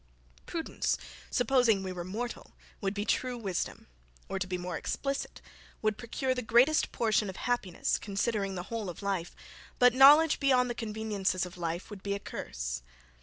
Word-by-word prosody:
Prudence, 325 -2 -1 0.3
supposing 245 -5 +3
we 190 - -3
were 180 -1 -5
mortal, 220 +7 -5 0.3
would 195 0 -1
be 205 +1 -2
true 250 +1 0
wisdom, 195 -6 -3 0.4
or, 195 - -3
to 185 - -2
be 180 0 -2
more 180 0 -4
explicit, 275 0 -3 0.4
would 215 -1 +2
procure 245 +4 -2
the 250 - -3
greatest 245 +7 +4
portion 220 -3 +1
of 190 - -6
happiness, 225 -8 -1
considering 200 -1 -1
the 175 - -4
whole 220 -4 -2
of 175 - -8
life; 190 -4 -2 0.4
but 250 -1 +6
knowledge 295 +4 +7
beyond 255 -3 +3
the - - -1
conveniences 210 -5 -1
of 180 - -10
life 170 +2 -4
would 200 -2 -8
be 200 0 -2
a - - -4
curse. - - -5
215 Hz, 170 wpm, -30 LUFS, 190-245 Hz, 0.4 s, knowledge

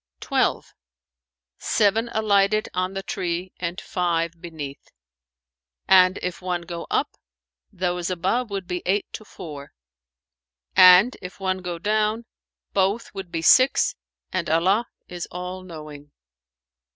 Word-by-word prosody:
"Twelve: - - 0 0.9
seven 220 +2 +2
alighted 215 -1 +2
on 185 +1 -2
the 195 - -3
tree 180 -1 -3
and 175 +2 -3
five 170 -3 -2
beneath; 150 -5 -8 1.0
and, 185 0 +6
if 180 0 -4
one 180 -1 -2
go 170 -1 -7
up, - - 0 0.6
those 175 -1 -2
above 190 +7 -1
would 195 -2 -4
be 180 -1 -3
eight 200 +2 +1
to - - -7
four; 150 -8 -10 1.0
and, 185 +7 +8
if 180 +1 -9
one 190 -1 -1
go 180 -2 -5
down, 215 +4 0 0.5
both 200 +4 0
would 195 -3 -7
be 165 -2 -3
six 255 +10 +5 0.4
and 185 -4 -1
Allah 190 +9 +2 0.2
is 175 -1 -6
all 180 +1 -6
knowing." 150 -5 -10
185 Hz, 125 wpm, -24 LUFS, 170-200 Hz, 1.0 s, and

